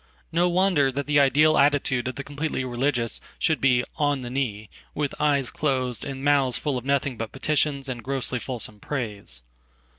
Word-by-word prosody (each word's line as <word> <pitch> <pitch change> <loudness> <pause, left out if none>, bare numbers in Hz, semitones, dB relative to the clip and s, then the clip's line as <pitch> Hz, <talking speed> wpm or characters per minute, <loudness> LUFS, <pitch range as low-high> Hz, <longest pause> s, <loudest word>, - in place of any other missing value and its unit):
No 175 +2 +3
wonder 175 -6 +3
that 140 +2 -3
the 145 0 +3
idealattitude 140 -2 +4
of 130 - -3
the 140 - -5
completely 145 -2 -3
religious 120 -1 -1 0.2
should 160 - +1
be 125 -2 +4
"on 145 -3 +1
the 120 - -6
knee," 110 -6 -2 0.3
witheyes 145 -2 0
closed 130 -5 -1
and 135 -1 -6
mouths 140 -4 +3
full 145 -3 -1
of 125 0 -4
nothing 140 -2 0
but 115 -1 -4
petitions 140 0 0
and 125 -3 -4
grosslyfulsome 125 -4 -2
praise. 105 - -4
135 Hz, 155 wpm, -25 LUFS, 125-145 Hz, 0.3 s, idealattitude